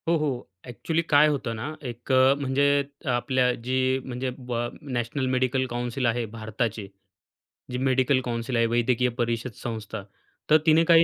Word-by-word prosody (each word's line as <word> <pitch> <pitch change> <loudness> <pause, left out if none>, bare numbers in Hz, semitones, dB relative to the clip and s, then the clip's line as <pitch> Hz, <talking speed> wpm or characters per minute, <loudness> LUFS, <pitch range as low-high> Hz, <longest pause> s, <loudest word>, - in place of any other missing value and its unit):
हो, 170 - +4
हो. 140 -5 -2 0.2
अ‍ॅक्चुअली 160 +7 -1
काय 145 +1 +6
होतं 140 -6 -1
ना 130 +8 -5
एक 120 +2 -6
अ, 130 +1 +6
म्हणजे 135 0 +1 0.5
आपल्या 125 0 +2
जी 130 +1 +1
म्हणजे 130 0 -3
ब 125 -2 -6 0.3
नॅशनल 130 -1 -2
मेडिकल 130 0 +1
काउंसिल 120 +2 -2
आहे, 120 0 +1
भारताचे, 110 -1 -3 0.8
जी 125 - -2
मेडिकल 130 0 +2
काउंसिल 120 +1 -2
आहे, 115 - +4
वैद्यकीय 120 +2 +2
परिषद 115 +1 -1
संस्था, 110 -3 -5 0.5
तर 155 - +8
तिने 160 0 +6
काही 165 0 +7
125 Hz, 150 wpm, -26 LUFS, 120-135 Hz, 0.8 s, तर